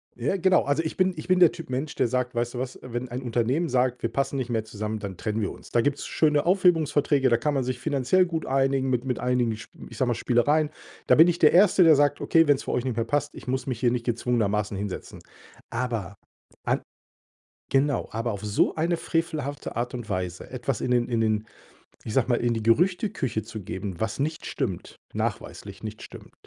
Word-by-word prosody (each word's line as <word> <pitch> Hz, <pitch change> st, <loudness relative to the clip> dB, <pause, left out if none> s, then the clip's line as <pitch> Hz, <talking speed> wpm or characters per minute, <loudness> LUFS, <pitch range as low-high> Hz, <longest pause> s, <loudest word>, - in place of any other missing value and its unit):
Ja, 125 Hz, +10 st, -1 dB
genau. 185 Hz, 0 st, +4 dB
Also, 145 Hz, +3 st, 0 dB
ich 155 Hz, -, -4 dB
bin 185 Hz, 0 st, +2 dB
ich 155 Hz, -, -8 dB
bin 185 Hz, 0 st, +3 dB
der 175 Hz, -3 st, +7 dB
Typ 165 Hz, -5 st, -10 dB
Mensch, 135 Hz, +4 st, -3 dB
der -, -, +2 dB
sagt: 125 Hz, +1 st, -1 dB
„Weißt 120 Hz, +1 st, -1 dB
du -, -, -3 dB
was? 130 Hz, 0 st, -5 dB
Wenn 125 Hz, 0 st, -5 dB
ein 125 Hz, +2 st, -4 dB
Unternehmen 125 Hz, +7 st, 0 dB
sagt, 125 Hz, -1 st, +1 dB
wir 115 Hz, -, -1 dB
passen 140 Hz, +1 st, -1 dB
nicht 125 Hz, -2 st, -3 dB
mehr 110 Hz, -2 st, -1 dB
zusammen, 110 Hz, 0 st, -4 dB
dann 100 Hz, -3 st, -6 dB
trennen 110 Hz, +2 st, -2 dB
wir 100 Hz, -, -1 dB
uns.“ -, -, -13 dB
Da 120 Hz, -, +3 dB
gibt's 145 Hz, +3 st, -1 dB
schöne 150 Hz, -1 st, +2 dB
Aufhebungsverträge, 155 Hz, -7 st, +3 dB
da 120 Hz, -, +4 dB
kann 145 Hz, +4 st, -1 dB
man 135 Hz, -, 0 dB
sich 125 Hz, 0 st, -3 dB
finanziell 140 Hz, +8 st, +2 dB
gut 165 Hz, -3 st, -3 dB
einigen 135 Hz, 0 st, +1 dB
mit 125 Hz, 0 st, 0 dB
mit 125 Hz, -2 st, -2 dB
einigen, 125 Hz, -2 st, +1 dB
sch 110 Hz, -, -11 dB, 0.2 s
ich -, -, -11 dB
sage 130 Hz, -, +1 dB
mal, 120 Hz, -, +1 dB
Spielereien. 145 Hz, +7 st, +2 dB, 0.4 s
Da -, -, +6 dB
bin 160 Hz, +2 st, +8 dB
ich 175 Hz, -1 st, 0 dB
der 150 Hz, -, +6 dB
1. 185 Hz, 0 st, +6 dB
der 160 Hz, -2 st, +7 dB
sagt: 145 Hz, 0 st, +2 dB
„Okay, 165 Hz, -1 st, +4 dB
wenn's 145 Hz, -2 st, +3 dB
für -, -, -3 dB
euch 125 Hz, -, 0 dB
nicht 125 Hz, -, -1 dB
mehr 115 Hz, -, 0 dB
passt, 145 Hz, +3 st, -1 dB
ich -, -, -11 dB
muss 130 Hz, +1 st, -2 dB
mich 125 Hz, -3 st, -3 dB
hier 120 Hz, -1 st, +2 dB
nicht 120 Hz, -1 st, -2 dB
gezwungenermaßen 110 Hz, -4 st, 0 dB
hinsetzen.“ 100 Hz, -1 st, -6 dB, 0.5 s
Aber 115 Hz, -5 st, -3 dB, 0.5 s
an -, -, +1 dB, 0.9 s
genau, 140 Hz, +1 st, +1 dB
aber 115 Hz, +2 st, -2 dB
auf 100 Hz, -, -7 dB
so 105 Hz, -1 st, +1 dB
eine 170 Hz, +2 st, 0 dB
frevelhafte 155 Hz, -4 st, -3 dB
Art 120 Hz, +1 st, -2 dB
und 120 Hz, -3 st, -6 dB
Weise 90 Hz, -3 st, -4 dB
etwas -, -, -3 dB
in 125 Hz, -, -1 dB
den 120 Hz, -1 st, +2 dB
in 115 Hz, -2 st, +1 dB
den 110 Hz, 0 st, 0 dB, 0.6 s
ich 110 Hz, -, -5 dB
sage 130 Hz, -3 st, +2 dB
mal, 120 Hz, -, +3 dB
in 120 Hz, -1 st, 0 dB
die 115 Hz, -, -3 dB
Gerüchteküche 140 Hz, -, +1 dB
zu 110 Hz, +1 st, -8 dB
geben, 95 Hz, 0 st, -6 dB
was 110 Hz, +3 st, -2 dB
nicht 155 Hz, +3 st, -2 dB
stimmt, 90 Hz, -3 st, -4 dB, 0.2 s
nachweislich -, -, -4 dB
nicht -, -, -7 dB
stimmt, -, -, -12 dB
125 Hz, 220 wpm, -26 LUFS, 115-150 Hz, 0.9 s, bin